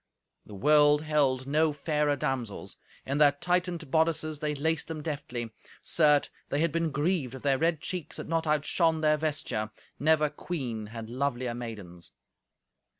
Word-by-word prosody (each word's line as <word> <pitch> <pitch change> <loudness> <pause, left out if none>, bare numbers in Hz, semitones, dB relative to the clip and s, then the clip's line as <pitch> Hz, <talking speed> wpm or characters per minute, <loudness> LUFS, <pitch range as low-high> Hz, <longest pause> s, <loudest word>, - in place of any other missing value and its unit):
The 105 - -10
world 150 +5 +5
held 140 -4 +1
no 155 +3 +2
fairer 150 0 0
damsels. 130 -6 -3 0.3
In 140 +2 -1
their 145 -2 +6
tightened 175 0 -1
bodices 160 -1 +1
they 150 0 -1
laced 160 +1 -1
them 155 -2 -5
deftly. 125 -7 -4 0.3
Certes, 150 -3 +3 0.2
they 140 - 0
had 165 0 +2
been 165 +1 0
grieved 150 -3 -1
if 130 - -10
their 135 -2 +2
red 165 -2 +1
cheeks 180 -2 -4
had - - -6
not 165 0 0
outshone 155 +2 +2
their 155 -1 +3
vesture. 145 -8 -2 0.3
Never 155 +2 +3
queen 125 -10 -4
had 115 +1 -8
lovelier 130 -2 -1
maidens. 105 -8 -8
150 Hz, 150 wpm, -29 LUFS, 130-160 Hz, 0.3 s, their